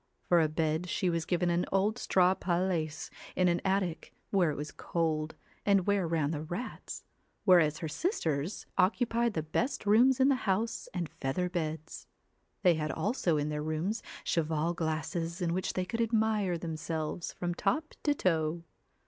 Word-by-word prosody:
For 175 -1 +6
a 155 - +2
bed 160 +2 -1
she 180 0 +1
was 165 -1 -2
given 175 -1 +1
an 170 +1 +2
old 205 +5 +2
straw 185 0 +4
paillasse 175 -4 -1 0.2
in 185 - +3
an 175 0 +2
attic, 190 -3 -1 0.2
where 185 -5 +3
it 150 - -2
was 150 +1 -5
cold, 160 -2 -1 0.3
and 195 -3 +3
where 200 -4 +2
ran 160 -3 +1
the 150 -2 -3
rats, 175 +10 -6 0.4
whereas 165 -6 +5
her 160 - -4
sisters 160 - -1
occupied 235 +4 +2
the 160 - 0
best 245 - -1
23 - - -10
CINDER, 225 +3 +7
rooms 265 0 +3
in 265 +1 +5
the 265 -2 +1
house 220 +4 0
and 175 -3 -2
feather 145 +6 -2
beds. 160 -3 -4 0.6
They 180 -3 +6
had 155 -1 -2
ELLA - - -4
also 195 - +1
in 145 0 0
their 150 0 -2
rooms 155 +8 -2 0.2
cheval 160 0 0
glasses 165 +1 -2
in 170 -2 0
which 185 +1 -1
they 185 - -1
could 230 +5 -2
admire 220 -5 +1
themselves 160 0 -4
from 175 -1 -2
top 310 - -1
to 290 -1 +2
toe. 165 - 0
175 Hz, 175 wpm, -31 LUFS, 160-195 Hz, 0.6 s, CINDER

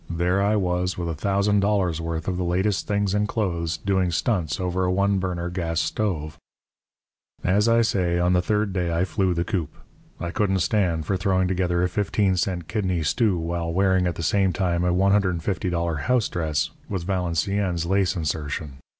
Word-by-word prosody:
There 90 +3 +1
I 105 +2 +2
was, 90 -2 0
with 85 -1 -3
a - - -1
thousand 100 +5 +1
dollars' 95 -5 +1
worth 80 -1 -4
of 95 - 0
the 90 - -1
latest 95 +3 0
things 100 -2 0
in 105 0 +1
clothes, 85 -7 -1
doing 95 -2 0
stunts 85 -1 0
over 90 0 -1
a 90 - +1
one 100 +1 +2
burner 90 -2 -3
gas 85 -2 -2
stove. 85 -8 -2 1.0
"As 100 +5 +2
I 115 0 +4
say, 90 -5 +1
on 90 +1 +2
the 90 - +3
third 105 +1 0
day 90 -2 -1
I 85 +2 +1
flew 95 -3 0
the 85 - 0
coop. 90 -8 -2 0.5
I 85 - -3
couldn't 95 -2 +1
stand 85 -5 +1
for 95 +4 0
throwing 95 -1 +1
together 90 -1 0
a - - +3
fifteen 100 0 +1
cent 90 -2 -2
kidney 95 -6 -1
stew 100 - +2
while 85 0 -2
wearing, 95 0 +2
at 85 - -2
the 85 - -5
same 95 +2 +2
time, 90 -2 0
a 90 - +2
$150 90 -3 +1
house 125 +7 +1
dress, 80 -4 -1 0.2
with 95 -4 -3
Valenciennes 90 0 -1
lace 95 0 +1
insertion. 75 -3 -3
90 Hz, 185 wpm, -24 LUFS, 85-100 Hz, 1.0 s, I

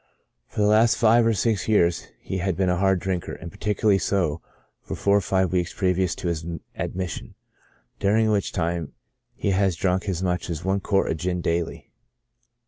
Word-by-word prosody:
For - - -3
the - - +4
last 110 +2 +4
five 115 0 +5
or 115 - +3
six 105 0 0
years 85 -6 +2
he 95 - -4
had 90 -1 -1
been 95 -1 +2
a 90 - +1
hard 95 0 +2
drinker, 90 -1 -3
and 85 - -8
particularly 105 +1 +1
so 85 -5 0 0.4
for - - -6
four 100 0 +2
or - - +2
five 95 0 +1
weeks 90 -1 -1
previous 90 -2 +1
to 90 - -5
his 85 -2 -2 0.3
admission, 90 -1 -4 0.6
during 110 +2 +3
which 100 -2 0
time 85 -3 -2 0.4
he 100 - -1
has 95 -2 +2
drunk 95 +3 0
as 90 -1 -2
much 90 -2 -1
as 85 +1 -4
one 95 +1 +1
quart 95 0 +1
of 80 - -2
gin 90 +2 -2
daily. 85 -1 -2
95 Hz, 185 wpm, -24 LUFS, 85-100 Hz, 0.6 s, five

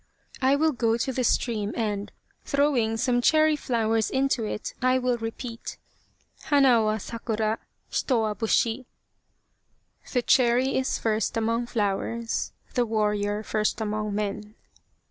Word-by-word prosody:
I 265 +1 +4
will 315 +2 +2
go 230 -4 +1
to 265 +3 -2
the 255 - -1
stream 220 -3 0
and, 210 -3 -2 0.3
throwing 265 -6 +1
some 245 +1 +1
cherry 310 +3 +4
flowers 225 -5 0
into 265 -3 +1
it, 210 - -4
I 255 0 +3
will 250 -1 0
repeat: 230 +1 -6 0.7
Hana 270 -5 +5
wa 215 0 +1
sakura: 220 0 -2 0.3
Hito 250 -4 0
wa 215 -1 0
busbi. 230 +3 0 1.3
The 245 -2 +1
cherry 250 +2 +3
is 265 0 0
first 220 0 -1
among 230 +1 0
flowers: 225 +1 -2 0.2
The 245 -3 +1
warrior 210 -1 0
first 215 0 -1
among 210 -1 -2
men." 210 +1 -4
230 Hz, 130 wpm, -26 LUFS, 215-255 Hz, 1.3 s, Hana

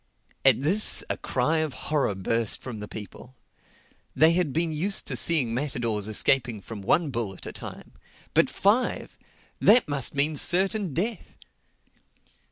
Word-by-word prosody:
At 135 -2 +5
this 190 +9 +4
a - - -3
cry 145 +6 -1
of 155 -3 -3
horror 145 -9 -1
burst 115 +3 0
from 120 -5 -8
the 105 - -7
people. 110 +5 -10 0.8
They 160 +1 +6
had 175 -4 0
been 165 +3 -1
used 180 +6 -2
to - - -2
seeing 140 -9 +1
matadors 115 -6 -2
escaping 120 +1 +1
from 105 +2 -9
one 150 - +1
bull 115 -6 -4
at - - -12
a - - -7
time. - - -10 0.4
But - - +3
five!—That 225 +1 +1
must 145 -2 -1
mean 145 +2 +2
certain 190 - 0
death. 220 +6 -3
140 Hz, 145 wpm, -25 LUFS, 115-170 Hz, 0.8 s, They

